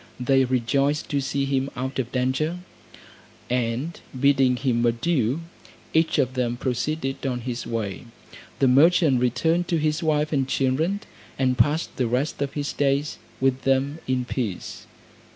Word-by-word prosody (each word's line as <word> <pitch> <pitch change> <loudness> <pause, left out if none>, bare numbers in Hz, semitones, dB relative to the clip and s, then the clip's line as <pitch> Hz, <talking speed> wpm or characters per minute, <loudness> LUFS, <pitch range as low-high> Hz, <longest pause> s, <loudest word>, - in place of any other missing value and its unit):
They 135 +1 +3
rejoiced 135 +4 0
to 140 -1 +1
see 140 +1 -1
him 135 0 0
out 130 +2 -3
of 125 -2 -2
danger; 130 +6 0 0.9
and 125 +6 -1 0.2
bidding 135 -2 +4
him 125 -2 0
adieu, 125 +3 +1 0.5
each 160 0 +2
of 130 -3 +1
them 120 -2 -1
proceeded 135 +2 -2
on 125 -2 -2
his 120 0 -4
way. 110 -2 -3 0.5
The 135 - +3
merchant 145 0 +5
returned 160 +8 +1
to 170 - +1
his 155 +1 0
wife 155 -1 +1
and 135 -2 +1
children, 155 +11 0 0.4
and 130 -1 +2
passed 145 +7 +1
the 125 - +1
rest 130 +6 -1
of 140 -1 -2
his 145 -1 -3
days 140 +1 0 0.2
with 135 0 +1
them 135 +3 +1
in 130 -1 0
peace. 115 -7 -4
135 Hz, 150 wpm, -24 LUFS, 125-150 Hz, 0.9 s, merchant